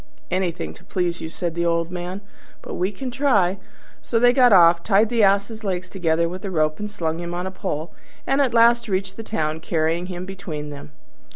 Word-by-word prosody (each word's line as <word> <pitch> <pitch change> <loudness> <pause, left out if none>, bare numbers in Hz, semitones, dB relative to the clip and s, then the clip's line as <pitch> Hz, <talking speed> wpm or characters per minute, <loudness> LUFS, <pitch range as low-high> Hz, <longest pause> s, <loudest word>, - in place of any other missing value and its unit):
"Anything 175 - -2
to 80 - -18
please 175 -2 -2
you," 160 - -5
said 170 0 -3
the 170 +1 -1
old 170 0 0
man, 180 +2 -5 0.5
"we 185 +3 -1
can 255 +6 -6
but - - -10
try." 200 -10 +2 0.4
So 230 - -1
they 245 +1 +5
got 250 -2 +5
off, 170 -3 +6
tied 210 +3 +3
the 235 -2 +1
Ass's 205 +3 +2
legs 185 -2 -3
together 170 -3 +1
with 185 +3 -7
a 200 - -3
rope 155 -3 0
and 210 0 -4
slung 165 -5 -3
him 175 0 -5
on 180 +1 -3
a 190 - -3
pole, 170 -4 -4 0.3
and 270 +2 +2
at 265 -3 +2
last 235 0 +4
reached 190 0 -2
the 225 - -6
town, 155 -8 -2
carrying 165 +2 -1
him 180 -1 -6
between 160 -6 -6
them. 145 -1 -10
185 Hz, 210 wpm, -22 LUFS, 170-210 Hz, 0.5 s, off